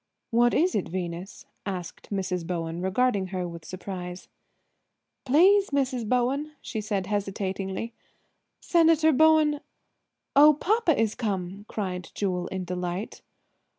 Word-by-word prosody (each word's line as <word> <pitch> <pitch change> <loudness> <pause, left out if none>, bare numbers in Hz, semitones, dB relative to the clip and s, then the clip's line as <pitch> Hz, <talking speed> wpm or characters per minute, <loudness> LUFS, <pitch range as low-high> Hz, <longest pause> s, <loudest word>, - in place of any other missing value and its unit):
"What 240 +1 +4
is 360 +3 +3
it, 195 - -1
Venus?" 180 +1 -5 0.2
asked 185 -3 -6
Mrs. 185 -4 -2
Bowen, 170 -1 -3
regarding 195 +1 +1
her 185 -1 -3
with 170 -1 -9
surprise. 180 0 -7 1.0
"Please, 385 +9 +5
Mrs. 260 -5 -1
Bowen," 270 +5 0
she 220 - -5
said 205 -3 -2
hesitatingly, 195 +1 -3 0.7
"Senator 325 -2 +4
Bowen—" 310 0 +4 0.8
"Oh, 300 +2 +8
papa 370 - +2
is 220 -2 +2
come," 195 -2 -3
cried 180 -5 -4
Jewel 180 -3 -1
in 190 -1 -4
delight. 180 +2 -4
200 Hz, 115 wpm, -26 LUFS, 180-275 Hz, 1.0 s, Oh